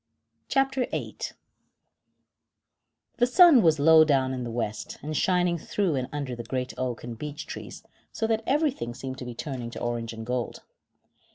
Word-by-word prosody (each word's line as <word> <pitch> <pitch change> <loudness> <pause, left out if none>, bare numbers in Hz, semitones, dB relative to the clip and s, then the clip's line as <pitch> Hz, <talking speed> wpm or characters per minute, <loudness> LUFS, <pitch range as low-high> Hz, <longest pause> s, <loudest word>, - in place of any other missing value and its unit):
CHAPTER 270 -2 +1
VIII - - -5 2.0
The 245 - +4
sun 315 -1 +7
was 160 -4 +4
low 160 +2 +7
down 135 -4 +2
in 125 -1 -3
the 120 - -4
west, 115 -2 -4
and 155 +1 -4
shining 180 0 +2
through 190 +1 -1
and 130 -2 -2
under 140 -4 -4
the 120 - -5
great 125 +1 -3
oak 125 -2 -3
and 120 -1 -6
beech 150 +4 -6
trees, - - -8 0.3
so 225 - -2
that 225 0 +1
everything 275 - 0
seemed 130 -1 -6
to 125 - -6
be 120 -1 -7
turned 120 -3 -5
to - - -6
orange 120 -1 -2
and 110 -1 -7
gold. 125 0 -3
140 Hz, 170 wpm, -27 LUFS, 120-180 Hz, 2.0 s, sun